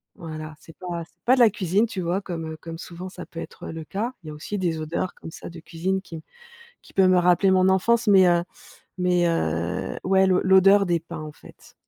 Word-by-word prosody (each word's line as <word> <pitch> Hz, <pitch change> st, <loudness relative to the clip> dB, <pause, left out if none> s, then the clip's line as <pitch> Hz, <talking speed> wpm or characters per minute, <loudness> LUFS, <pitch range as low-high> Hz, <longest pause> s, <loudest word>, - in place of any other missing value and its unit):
voilà, 155 Hz, -2 st, -8 dB
c'est 165 Hz, -, -16 dB
pas 175 Hz, -2 st, -5 dB
c'est -, -, -35 dB
pas 250 Hz, -, +5 dB
de 260 Hz, -, -1 dB
la 235 Hz, -, +7 dB
cuisine, 200 Hz, +2 st, 0 dB
tu 195 Hz, -4 st, -5 dB
vois? 175 Hz, +3 st, -1 dB
Comme, 170 Hz, -4 st, -5 dB
heu, 155 Hz, -, -8 dB
comme 165 Hz, +1 st, -8 dB
souvent, 175 Hz, +2 st, -8 dB
ça -, -, -9 dB
peut 165 Hz, -, -10 dB
être -, -, -8 dB
le 160 Hz, 0 st, -6 dB
cas, 215 Hz, +10 st, -4 dB
il -, -, -12 dB
y -, -, -5 dB
a -, -, -7 dB
aussi 175 Hz, +7 st, -5 dB
des 170 Hz, -3 st, -1 dB
odeurs, 165 Hz, +4 st, -3 dB
comme 165 Hz, -, -10 dB
ça, -, -, -9 dB
de 170 Hz, -1 st, -10 dB
cuisine 180 Hz, +4 st, -3 dB
qui 165 Hz, -4 st, -9 dB, 0.6 s
qui -, -, -18 dB
peut 190 Hz, -1 st, +4 dB
me 185 Hz, 0 st, +5 dB
rappeler 180 Hz, +2 st, +4 dB
mon 185 Hz, 0 st, +4 dB
enfance, 230 Hz, +5 st, +2 dB
mais, 195 Hz, -3 st, +6 dB
heu 175 Hz, 0 st, +2 dB, 0.5 s
mais, 180 Hz, -1 st, +2 dB
heu, 85 Hz, -, -2 dB
ouais, 190 Hz, +1 st, +3 dB
l'o 185 Hz, -1 st, +3 dB
l'odeur 195 Hz, +1 st, +6 dB
des 175 Hz, -2 st, +1 dB
pins, 165 Hz, -1 st, -9 dB
en 155 Hz, -, -7 dB
fait. -, -, -17 dB
180 Hz, 235 wpm, -24 LUFS, 165-190 Hz, 0.6 s, la